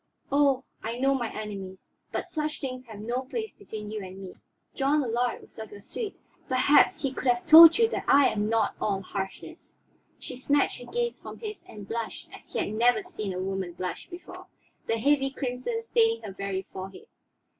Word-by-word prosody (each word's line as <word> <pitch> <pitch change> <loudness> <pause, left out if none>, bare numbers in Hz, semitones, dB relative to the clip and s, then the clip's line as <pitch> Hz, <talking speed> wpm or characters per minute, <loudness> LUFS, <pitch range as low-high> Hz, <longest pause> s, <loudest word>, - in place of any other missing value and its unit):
"Oh, 275 -2 +3 0.2
I 230 +2 -4
know 270 +2 +3
my 240 -4 -2
enemies. 195 -3 -7 0.2
But - - -2
such 305 -1 -3
things 255 -2 -5
have 215 -3 -10
no 240 +4 -2
place 435 - -5
between 215 - -8
you 215 -2 -4
and 185 0 -9
me. 190 -2 -8 0.4
John 285 +2 +2
Allard 240 0 -1
was - - -14
of 220 -1 -7
your 205 -1 -11
suite; 425 - -5 0.3
perhaps 260 +4 +4
he 270 -1 0
could 265 - -4
have 240 -1 +2
told 330 +1 +11
you 455 -1 +5
that - - -3
I 280 -1 +6
am 210 0 -1
not 225 -2 +2
all 195 -2 0
harshness." 195 0 -7 0.4
She - - -8
snatched 280 +3 +1
her 245 - -11
gaze 475 0 -1
from - - -9
his 425 -2 -7
and 205 -2 -10
blushed 230 +1 -5
as - - -13
he - - -4
had 205 - -1
never 245 - +3
seen 270 - -5
a 180 - -4
woman 190 -1 -3
blush 180 - -5
before, 365 +1 -10 0.4
the 225 - +1
heavy 270 +3 +3
crimson 270 - -3
staining 455 0 +2
her 200 - -6
very 195 -1 -3
forehead. 195 - -8
250 Hz, 195 wpm, -27 LUFS, 210-300 Hz, 0.4 s, told